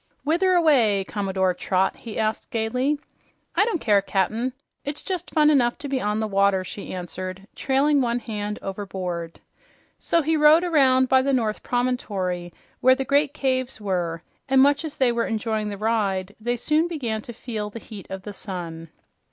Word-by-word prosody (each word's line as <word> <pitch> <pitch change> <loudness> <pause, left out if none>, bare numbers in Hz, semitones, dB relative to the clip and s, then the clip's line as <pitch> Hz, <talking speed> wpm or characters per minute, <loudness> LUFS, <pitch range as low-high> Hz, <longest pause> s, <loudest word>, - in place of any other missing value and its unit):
"Whither 350 +5 +2
away, 255 - +4
Commodore 190 -2 0
Trot?" 185 +1 0
he 225 -3 -8
asked 220 0 -1
gaily. 250 +6 0 0.6
"I 410 - +4
don't 435 -7 -1
care, 205 -6 +3
Cap'n. 215 +6 0 0.3
It's 285 +1 -5
just 365 -3 -4
fun 305 -1 +4
enough 245 -5 +3
to 290 - -6
be 270 -2 -1
on 210 +1 0
the 220 - -1
water," 195 -1 +2
she 200 +2 -7
answered, 185 +2 -6
trailing 280 +2 +2
one 240 -1 +1
hand 210 -3 -4
overboard. 185 -4 -5 0.6
So 335 -1 +1
he 320 +2 +1
rowed 305 +2 +6
around 265 -6 +4
by 260 0 +5
the 275 +1 0
North 225 -4 0
Promontory, 195 -8 -2 0.3
where 260 +1 +5
the 270 0 -3
great 285 +2 +2
caves 260 -2 -1
were, 175 -5 -2 0.3
and 265 0 +5
much 285 +3 +4
as 315 -3 -6
they 255 -3 +3
were 235 0 0
enjoying 220 -1 -1
the 200 - -5
ride, 205 -3 -1
they 240 +2 -1
soon 310 +7 +2
began 240 -10 -3
to 240 - -9
feel 220 -3 -5
the 210 - -9
heat 215 -3 -10
of 190 0 -6
the 205 - -7
sun. 170 -5 -7
225 Hz, 175 wpm, -24 LUFS, 195-270 Hz, 0.6 s, rowed